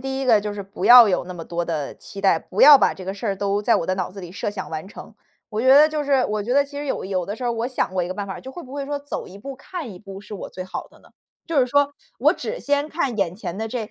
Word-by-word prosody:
第 265 +1 -3
一 270 - -2
个 225 -4 +5
就 205 0 -4
是 200 - -5
不 195 -1 -7
要 240 0 +10
有 180 -3 0
那 180 - -8
么 165 -2 -8
多 175 +1 -3
的 155 -4 -3
期 200 - -10
待， 195 -4 +3
不 185 - -5
要 290 -1 +10
把 - - +2
这 185 - -10
个 190 - -3
事 205 +4 -6
儿 200 - 0
都 200 +1 -1
在 230 +3 +3
我 - - +1
的 185 +2 -1
脑 185 -2 -2
子 195 - -9
里 175 -2 -9
设 195 - -4
想 200 -2 -7
完 160 +2 -5
成。 - - -11 0.4
我 215 -1 -3
觉 250 - -1
得 285 +4 +8
就 305 -1 -2
是 275 -2 +2
我 215 0 -2
觉 235 +5 -2
得 285 0 +4
其 285 0 -9
实 290 - -5
有 - - -2
有 185 -2 -2
的 205 - -4
时 255 - -10
候 245 - 0
儿 - - 0
我 230 +1 -2
想 255 -6 -2
过 185 -2 0
一 - - -5
个 185 - -5
办 200 +1 -4
法， 190 - -6
就 265 - -10
会 345 - -8
不 260 - -13
会 280 -1 -4
说， 290 - -2
走 285 +1 -6
一 190 - -12
步 270 +6 -8
看 290 - -7
一 180 - -11
步 195 0 -10
是 210 - -13
我 205 - -6
最 185 - -7
好 185 - -6
的 - - -22
呢？ - - -21 0.4
就 330 -3 -1
是 255 - +4
说， 285 +2 +2 0.3
我 - - +5
只 - - -5
先 285 +1 0
看 275 -9 -2
眼 180 -3 0
前 185 -2 -6
的 220 - -2
这 225 -2 -5
215 Hz, 360 characters per minute, -22 LUFS, 190-270 Hz, 0.4 s, 要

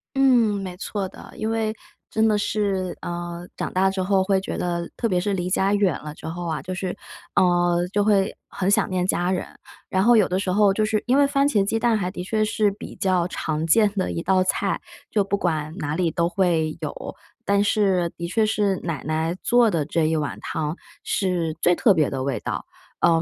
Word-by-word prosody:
嗯， 240 -7 +4
没 180 -1 -6
错 195 0 -3
的， - - -13
因 220 +1 -2
为 220 -1 0 0.4
真 220 0 +2
的 215 - +3
是， 195 -4 -1
呃， 175 0 -5
长 - - -3
大 190 +1 +2
之 190 -1 -2
后 190 0 +2
会 190 -1 +1
觉 - - -4
得 170 -1 -2
特 230 - 0
别 180 -3 +1
是 200 +2 -1
离 180 -1 -2
家 195 +1 +2
远 200 -6 +2
了 150 -1 -6
之 - - -9
后 170 +1 -4
啊， 160 - -2
就 185 0 -5
是， 185 0 -4 0.4
呃， 175 -1 +3
就 205 0 +3
会 200 -2 +2
很 190 +1 -1
想 205 - +2
念 180 -1 0
家 180 -1 0
人。 185 - -1 0.4
然 190 0 +1
后 240 +1 +6
有 205 - +4
的 185 - 0
时 190 -2 -1
候 200 0 +4
就 215 - +1
是 215 0 0
因 255 +2 +3
为 285 -1 +5
番 275 0 +2
茄 210 -9 +2
鸡 225 +3 0
蛋 230 0 +2
还 185 -4 -1
的 180 -2 -6
确 215 +3 0
是 210 -1 +1
比 200 - -9
较 185 -3 +1
常 160 -2 -2
见 210 +3 +4
的 185 - -1
一 165 - -3
道 185 0 +3
菜， 195 +1 -1 0.3
就 205 -2 +2
不 200 +1 -1
管 155 -4 -2
哪 150 -3 -2
里 175 -2 +1
都 170 +2 0
会 170 -4 +1
有， 150 - -6 0.3
但 200 0 +3
是 190 -5 +2
的 170 0 -4
确 220 +5 +1
是 205 -3 +1
奶 165 -5 -4
奶 160 +2 -1
做 240 -1 +4
的 165 -7 0
这 155 +1 0
一 160 +1 +1
碗 150 -2 -2
汤 155 0 -3 0.3
是 175 -5 0
最 175 - +4
特 205 +1 +4
别 155 -4 +2
的 130 -1 -3
味 140 - -1
道。 - - -4 0.4
呃， 165 -1 +4
185 Hz, 240 characters per minute, -23 LUFS, 170-205 Hz, 0.4 s, 后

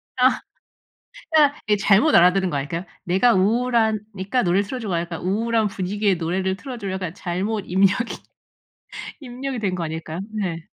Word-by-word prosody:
아. 255 +1 +3 0.9
그러니까 295 -2 +4
예 210 - +5
잘못 205 +10 +4
알아들은 180 +2 +5
거 145 - -2
아닐까요? 165 +6 -4 0.2
"내가 195 +7 +3
우울하니까 220 0 +1
노래를 185 +3 +2
틀어 255 +4 -5
줘."가 190 -7 -1
약간 170 -1 -6
"우울한 220 +3 +1
분위기의 200 0 0
노래를 185 +3 -1
틀어 255 +2 -7
줘."로 195 -4 -4
약간 185 -3 -4
잘못 195 +5 -2
입력이 195 +6 +2 1.0
입력이 260 -1 -5
된 190 -3 -1
거 170 - -3
아닐까요? 160 +1 -5
네. 180 -6 -3
195 Hz, 355 characters per minute, -22 LUFS, 180-230 Hz, 1.0 s, 예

